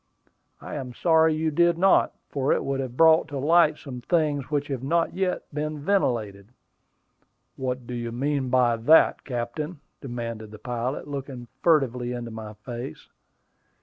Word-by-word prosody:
"I - - -9
am 125 -3 -6
sorry 160 -2 +4
you 160 0 0
did 170 +2 +3
not, 190 +2 +4
for 140 -1 -1
it - - +1
would 135 0 -1
have 130 -2 -5
brought 160 0 +6
to 145 -3 -5
light 155 +2 +4
some 125 -4 -8
things 150 -2 0
which 145 -1 0
have 135 -3 -3
not 165 +5 0
yet 185 -1 -1
been 150 +1 -3
ventilated." 120 - -1 1.1
"What 130 -1 -3
do 125 - -7
you 120 -1 -4
mean 135 +2 -1
by 120 -2 +3
that, 150 +9 +5
captain?" 135 +6 -4 0.2
demanded 115 -4 -5
the 110 - -11
pilot, 120 +5 -4
looking 135 -4 -6
furtively 125 -7 +2
into 120 -1 -5
my 110 -1 -8
face. 120 -2 -8
135 Hz, 155 wpm, -25 LUFS, 120-155 Hz, 1.1 s, brought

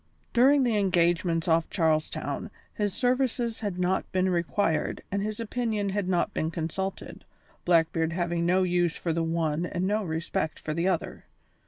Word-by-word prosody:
During 270 +4 +5
the 235 -4 +2
engagements 170 -3 +2
off 165 0 +2
Charles 160 -4 +1
Town - - -4 0.2
his 205 -1 -1
services 245 0 0
had 205 -5 -3
not 180 +1 0
been 185 0 +1
required 170 -1 0
and 200 +1 0
his 215 +1 -3
opinion 225 -3 -1
had 195 -1 -1
not 175 -2 +1
been 160 - -1
consulted, 170 +4 -4 0.4
Blackbeard 165 -1 +2
having 170 0 -1
no 180 +2 +3
use 175 -2 +1
for 165 - -2
the 165 - 0
one 165 -1 0
and 180 +1 -2
no 210 +2 +1
respect 160 0 -2
for 155 - -4
the 170 +3 0
other. 180 -4 -2
180 Hz, 165 wpm, -27 LUFS, 165-205 Hz, 0.4 s, During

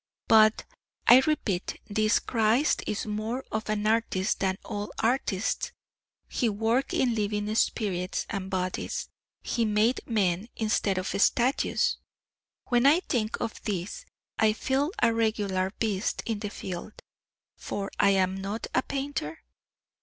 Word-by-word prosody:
But, 215 0 +5 0.4
I 250 - +9
repeat, 205 -12 -1
this 215 +1 +2
Christ 230 +5 +2
is 210 - -2
more 220 +5 -3
of 220 0 -3
an 210 0 -1
artist 215 -3 +1
than 190 -1 0
all 205 0 -4
artists 225 -4 0 0.5
he 240 - 0
worked 225 +5 0
in 245 -2 +2
living 210 -1 -1
spirits 190 -5 0
and 195 -3 -4
bodies 185 -1 -3 0.3
he 235 - 0
made 215 +3 +2
men 200 -3 +1
instead 215 -3 0
of 185 - -1
statues. 260 - +2 0.7
When 245 +1 +4
I 315 +5 +5
think 225 -10 -1
of 225 - -4
this 210 - -4 0.3
I 215 -1 +4
feel 270 +6 0
a 230 -1 +5
regular 205 -4 0
beast 210 -2 -1
in 225 -3 -2
the 210 -1 -4
field; 185 0 -6 0.6
for 200 0 -5
am 190 -1 +3
I - - -6
not 205 +3 -4
a 255 - +3
painter? 270 - -4
215 Hz, 135 wpm, -28 LUFS, 195-235 Hz, 0.7 s, I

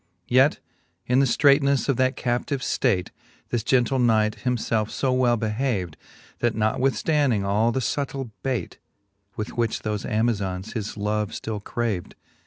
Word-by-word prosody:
II. - - +1
Yet 135 +4 +5 0.5
in 125 +1 +3
the 135 - +4
ftreightnefTe 140 0 +3
of 140 - +2
that 130 +1 +2
captive 125 +2 -1
ftate, 110 -8 0 0.4
This 120 - 0
gentle 130 +3 +2
knight 110 -2 +2
himfelfe 115 -3 0
fo 130 - 0
well 125 -2 +3
behaved, 105 - -1 0.4
That 120 -1 +1
notwithftanding 130 +2 +1
all 105 +4 +2
the 130 - -1
fubtill 135 0 -3
bait. 130 -3 -3 0.6
With 105 - -5
which 115 -2 0
thofe 105 -2 -3
Amazons 105 -3 -1
his 105 -1 -4
love 105 0 -1
ftill 105 -2 -5
craved. 110 -7 -3
120 Hz, 145 wpm, -24 LUFS, 105-130 Hz, 0.6 s, Yet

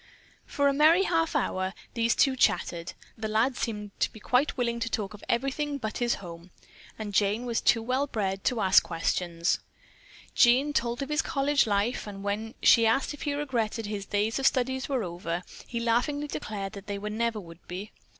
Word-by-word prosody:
For 285 0 +1
a 280 - +3
merry 315 +6 +5
half 330 -4 +1
hour 185 -9 -1 0.2
these 230 0 +2
two 270 -1 +3
chattered. 175 -7 0 0.3
The 220 - -2
lad 225 +5 +1
seemed 210 -4 -4
to - - +1
be 220 - -12
quite 255 +7 +1
willing 235 -1 0
to 230 0 -2
talk 210 -3 -3
of 210 - -12
everything 275 +4 0
but 220 -5 -4
his 240 -1 +1
home, 170 -1 -10 0.5
and 210 -2 -5
Jane 210 +4 +2
was 235 -2 -1
too 230 -1 +3
well 260 +4 0
bred 195 -6 -2
to 240 -3 +1
ask 190 -1 +6
questions. 170 0 -1 0.7
Jean 260 +5 +4
told 240 0 0
of 275 - -7
his 300 +1 +2
college 280 -3 +1
life, 210 +3 0
and 200 -1 -8
when 210 +3 -3
she 230 -1 +6
asked 270 +6 +1
if 295 - -11
he 290 -1 -1
regretted 235 -6 -2
that - - -5
his 200 -2 -4
days 210 +4 0
of 270 - +4
study 260 +1 +1
were 260 -5 0
over, 175 -1 -4 0.2
he 235 - -3
laughingly 245 +6 0
declared 205 -9 -5
that 200 -1 -10
they 200 -1 -3
never 215 +2 -2
would 165 -3 -13
be. 190 +4 -6
"Mr. - - -32
230 Hz, 200 wpm, -28 LUFS, 200-265 Hz, 0.7 s, ask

